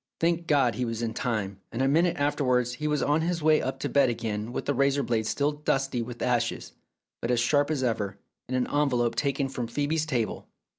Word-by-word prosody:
Thank 170 Hz, 0 st, +1 dB
God 135 Hz, -6 st, +3 dB
he 125 Hz, -, -2 dB
was 115 Hz, -1 st, -3 dB
in 115 Hz, -1 st, -2 dB
time, 105 Hz, -6 st, -2 dB
and 115 Hz, -, -5 dB
a 135 Hz, -, +3 dB
minute 170 Hz, +5 st, +3 dB
after 145 Hz, 0 st, 0 dB
wards 125 Hz, -1 st, +2 dB
he 150 Hz, +5 st, -3 dB
was 150 Hz, -1 st, +1 dB
on 150 Hz, +2 st, +2 dB
his 170 Hz, -1 st, -1 dB
way 155 Hz, 0 st, +5 dB
up 130 Hz, -, -3 dB
to -, -, 0 dB
bed 140 Hz, -3 st, +3 dB
again 110 Hz, -1 st, -3 dB
with -, -, -4 dB
the 145 Hz, -, +1 dB
razor 140 Hz, +1 st, +2 dB
blade 110 Hz, -2 st, 0 dB
still 145 Hz, +4 st, +1 dB
dusty 135 Hz, -4 st, -1 dB
with 120 Hz, 0 st, -6 dB
ashes, 120 Hz, -1 st, 0 dB, 0.5 s
but 115 Hz, -, -2 dB
as 125 Hz, -1 st, +2 dB
sharp 145 Hz, +4 st, +2 dB
as 145 Hz, -4 st, -1 dB
ever, 105 Hz, -5 st, -1 dB, 0.3 s
in 130 Hz, -, -1 dB
an 125 Hz, -1 st, +1 dB
envelope 125 Hz, -5 st, +1 dB
taken 140 Hz, +2 st, 0 dB
from 125 Hz, -3 st, -4 dB
Phcebe's 150 Hz, +5 st, -1 dB
table. 120 Hz, -8 st, -2 dB
130 Hz, 225 wpm, -27 LUFS, 120-145 Hz, 0.5 s, way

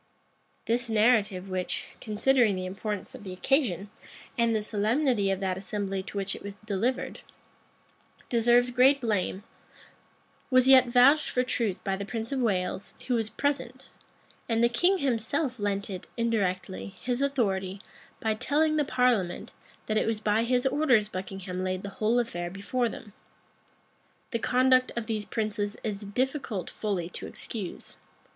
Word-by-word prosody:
[*] -, -, -41 dB
This 235 Hz, +1 st, 0 dB
narrative, 210 Hz, -4 st, +3 dB
which, 185 Hz, -1 st, -3 dB
considering 225 Hz, 0 st, +2 dB
the 185 Hz, 0 st, -3 dB
importance 195 Hz, +1 st, -4 dB
of -, -, -10 dB
the 190 Hz, -, -6 dB
occasion, 205 Hz, -, 0 dB, 0.4 s
and 235 Hz, -1 st, +2 dB
the 215 Hz, -, 0 dB
solemnity 215 Hz, +1 st, +1 dB
of 195 Hz, -1 st, 0 dB
that 190 Hz, -1 st, -1 dB
assembly 195 Hz, -1 st, -3 dB
to 200 Hz, -, -8 dB
which 195 Hz, 0 st, 0 dB
it -, -, -10 dB
was 200 Hz, 0 st, -8 dB
delivered, 215 Hz, +5 st, -2 dB, 1.1 s
deserves 240 Hz, +1 st, +4 dB
great 260 Hz, +3 st, +5 dB
blame, 205 Hz, -4 st, -1 dB, 1.1 s
was 255 Hz, -1 st, +4 dB
yet 260 Hz, -1 st, +8 dB
vouched 255 Hz, +5 st, +5 dB
for 250 Hz, -, +1 dB
truth 230 Hz, -6 st, -1 dB
by 195 Hz, -, 0 dB
the 195 Hz, -, -4 dB
prince 225 Hz, +3 st, -4 dB
of 275 Hz, -, 0 dB
Wales, 190 Hz, -5 st, -1 dB
who 255 Hz, -, 0 dB
was 225 Hz, -2 st, 0 dB
present; 260 Hz, +1 st, -2 dB, 0.6 s
and 230 Hz, 0 st, +2 dB
the 235 Hz, -, +5 dB
king 350 Hz, +11 st, +3 dB
himself 260 Hz, -, -1 dB
lent 200 Hz, 0 st, -1 dB
it, 185 Hz, -3 st, -7 dB
indirectly, 185 Hz, -, -1 dB
his 250 Hz, +1 st, -1 dB
authority, 200 Hz, -9 st, 0 dB, 0.4 s
by 220 Hz, -1 st, +1 dB
telling 305 Hz, +7 st, +1 dB
the 300 Hz, -, +3 dB
parliament, 250 Hz, -9 st, +1 dB, 0.3 s
that 215 Hz, 0 st, +1 dB
it -, -, 0 dB
was 225 Hz, -1 st, 0 dB
by 215 Hz, +1 st, +2 dB
his 250 Hz, +1 st, +1 dB
orders 260 Hz, -6 st, +3 dB
Buckingham 185 Hz, -1 st, -5 dB
laid 185 Hz, 0 st, -2 dB
the 200 Hz, -, -4 dB
whole 220 Hz, +3 st, +3 dB
affair 175 Hz, -8 st, -1 dB
before 230 Hz, +6 st, -1 dB
them. 210 Hz, -2 st, -10 dB, 1.2 s
The 230 Hz, -, -1 dB
conduct 255 Hz, +1 st, +3 dB
of 235 Hz, -2 st, -2 dB
these 215 Hz, -2 st, -2 dB
princes 215 Hz, -2 st, -2 dB
it -, -, -17 dB
is 210 Hz, -2 st, -3 dB
difficult 250 Hz, -, -2 dB
fully 195 Hz, -6 st, -2 dB
to -, -, -6 dB
excuse. 205 Hz, -6 st, -7 dB
220 Hz, 155 wpm, -28 LUFS, 195-250 Hz, 1.2 s, yet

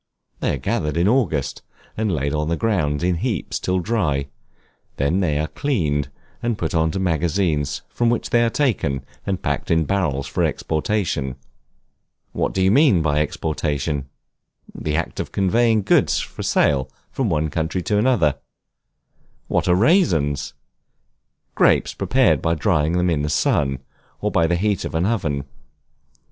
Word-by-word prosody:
They -, -, 0 dB
are -, -, -5 dB
gathered 75 Hz, +4 st, -2 dB
in 85 Hz, +3 st, +3 dB
August, 85 Hz, -, 0 dB, 0.3 s
and 110 Hz, -2 st, -1 dB
laid 70 Hz, -3 st, -1 dB
on 75 Hz, +1 st, -1 dB
the 85 Hz, -, +1 dB
ground 85 Hz, -10 st, 0 dB
in 90 Hz, -1 st, +1 dB
heaps 105 Hz, -, -2 dB
till 95 Hz, 0 st, 0 dB
dry; 80 Hz, -9 st, -1 dB, 0.7 s
they 70 Hz, -, 0 dB
are 70 Hz, -, +2 dB
then 80 Hz, -5 st, +1 dB
cleaned, 75 Hz, -, 0 dB, 0.3 s
and 120 Hz, -2 st, -1 dB
put 80 Hz, -, -3 dB
into 80 Hz, +1 st, +1 dB
magazines, 85 Hz, -3 st, 0 dB
from 120 Hz, -1 st, 0 dB
which 120 Hz, -, -1 dB
they 120 Hz, 0 st, +4 dB
are 115 Hz, -, +2 dB
taken 100 Hz, -, 0 dB, 0.2 s
and 95 Hz, -2 st, -2 dB
packed 70 Hz, -2 st, -2 dB
in 80 Hz, -1 st, +3 dB
barrels 85 Hz, -9 st, 0 dB
for -, -, -1 dB
exportation. 80 Hz, -5 st, -1 dB, 1.0 s
What -, -, -1 dB
do 95 Hz, -, 0 dB
you 95 Hz, -, +4 dB
mean 115 Hz, -, +4 dB
by 75 Hz, -1 st, +1 dB
Exportation? 75 Hz, -2 st, -2 dB, 0.6 s
The 75 Hz, -1 st, -3 dB
act 85 Hz, 0 st, -2 dB
of -, -, -4 dB
conveying 110 Hz, +2 st, +2 dB
goods -, -, +3 dB
for -, -, -7 dB
sale 65 Hz, -3 st, +2 dB, 0.2 s
from 130 Hz, -5 st, -1 dB
one 80 Hz, -2 st, 0 dB
country 80 Hz, +3 st, -2 dB
to 105 Hz, +2 st, +1 dB
another. 105 Hz, -, +2 dB, 1.1 s
What -, -, 0 dB
are 90 Hz, -, +4 dB
Raisins? 85 Hz, -, +2 dB, 1.0 s
Grapes -, -, +3 dB
prepared -, -, +2 dB
by 85 Hz, 0 st, +1 dB
drying 80 Hz, -2 st, +1 dB
them 90 Hz, 0 st, +2 dB
in 75 Hz, -3 st, 0 dB
the 75 Hz, -, -1 dB
sun, 70 Hz, -2 st, +1 dB, 0.4 s
or 105 Hz, -, -1 dB
by 85 Hz, -3 st, +3 dB
the 85 Hz, -, +1 dB
heat 100 Hz, +3 st, 0 dB
of -, -, -5 dB
an 85 Hz, +2 st, +1 dB
oven. 80 Hz, -11 st, -1 dB
85 Hz, 155 wpm, -21 LUFS, 75-100 Hz, 1.1 s, they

